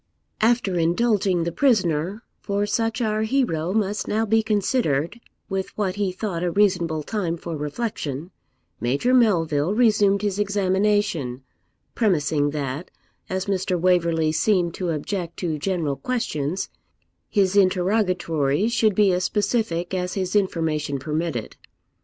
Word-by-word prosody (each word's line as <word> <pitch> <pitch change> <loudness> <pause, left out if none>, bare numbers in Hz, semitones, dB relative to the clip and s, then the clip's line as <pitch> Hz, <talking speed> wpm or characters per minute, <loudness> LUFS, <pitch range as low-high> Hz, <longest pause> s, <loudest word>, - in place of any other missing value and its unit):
After 220 -5 +2
indulging 185 +1 +2
the 170 - -2
prisoner, 190 - +1 0.2
for 200 0 -1
such 225 +3 -1
our 215 -1 0
hero 215 - 0
must 210 0 -1
now 220 +1 +1
be 225 +1 +3
considered, 210 - 0 0.3
with 190 -1 -3
what 195 -2 -1
he 200 -2 0
thought 185 -2 -4
a 180 - +1
reasonable 175 -5 +1
time 175 -3 -2
for 170 0 -6
reflection, 150 - -4 0.5
Major 140 - +1
Melville 175 - +3
resumed 210 -4 +3
his 205 -1 -1
examination, 195 -9 0 0.5
premising 150 -8 +1
that, 145 +2 -4 0.4
as 190 0 -2
Mr. 185 -2 -1
Waverley 170 -3 +2
seemed 175 0 +1
to 180 -1 -3
object 170 +2 -3
to 160 -4 -2
general 160 -5 -1
questions, 185 - -2 0.6
his 195 -1 +2
interrogatories 185 -2 +2
should 215 -3 +2
be 205 -1 +4
as 180 0 0
specific 195 -4 -1
as 180 -1 -2
his 185 0 -2
information 160 -7 0
permitted. 150 -3 -3
185 Hz, 130 wpm, -23 LUFS, 165-210 Hz, 0.6 s, be